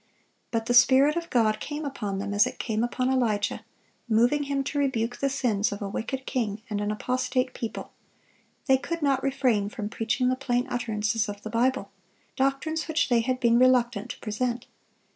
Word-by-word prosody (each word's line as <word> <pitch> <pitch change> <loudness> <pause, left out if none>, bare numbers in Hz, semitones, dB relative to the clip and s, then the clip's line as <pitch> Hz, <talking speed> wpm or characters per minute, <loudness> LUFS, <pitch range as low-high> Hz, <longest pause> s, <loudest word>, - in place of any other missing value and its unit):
But 225 -2 -1
the 245 - 0
Spirit 265 +5 +6
of 340 0 -3
God 215 -3 +2
came 295 +4 -5
upon 210 -8 -3
them 205 +1 -3
as 205 0 +4
it - - -7
came 220 -1 -1
upon 255 +2 0
Elijah, 220 -6 0 0.5
moving 245 +6 +3
him 275 -1 -1
to 290 +2 -2
rebuke 245 -4 0
the 275 - 0
sins 230 -6 0
of 205 - -5
a 200 - -4
wicked 260 +6 -4
king 220 -4 -2
and 205 0 -1
an 205 - -1
apostate 255 +3 -1
people; 230 - -6 0.7
they 265 -2 +4
could 335 +3 -4
not 275 -2 +2
refrain 255 -7 +1
from 215 -3 -5
preaching 235 +4 0
the 255 - +1
plain 250 -2 0
utterances 220 -2 -1
of 205 0 -7
the 220 - -6
Bible,—doctrines 270 +5 -2
which 315 -2 +1
they 240 -2 +4
had 255 +2 -1
been 235 -1 +4
reluctant 245 -3 +3
to - - -7
present. 240 +3 -2
245 Hz, 180 wpm, -26 LUFS, 220-270 Hz, 0.7 s, Spirit